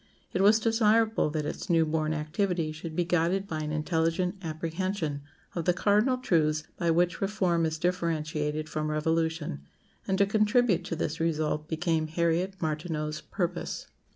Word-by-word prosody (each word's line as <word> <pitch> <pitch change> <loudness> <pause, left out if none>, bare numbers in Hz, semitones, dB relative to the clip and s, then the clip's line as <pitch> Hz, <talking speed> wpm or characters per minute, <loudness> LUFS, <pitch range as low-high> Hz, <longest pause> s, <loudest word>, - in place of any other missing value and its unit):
It 185 - +1
was 210 +3 +6
desirable 225 -3 +3
that 150 -1 -2
its 170 - -5
new 165 -2 +4
born 155 0 0
activity 160 +2 -1
should 155 +1 -7
be 175 - +2
guided 180 +3 +1
by 160 -4 -3
an 150 0 -3
intelligent 165 +3 0
apprehension 165 -1 -3 0.3
of 170 -3 -3
the 180 - +3
cardinal 210 +7 +3
truths 155 -10 +1
by 170 - 0
which 175 +2 +2
reform 185 -5 +1
is 160 0 -3
differentiated 155 -3 -1
from 155 0 -2
revolution; 160 - -1 0.5
and 190 - +1
to 200 - +5
contribute 215 -2 +3
to 170 - -3
this 160 -1 -2
result 155 -2 0
became 160 -1 0
Harriet 170 +4 0
Martineau's 155 -1 -2
purpose. 175 -3 -3
165 Hz, 155 wpm, -28 LUFS, 155-185 Hz, 0.5 s, was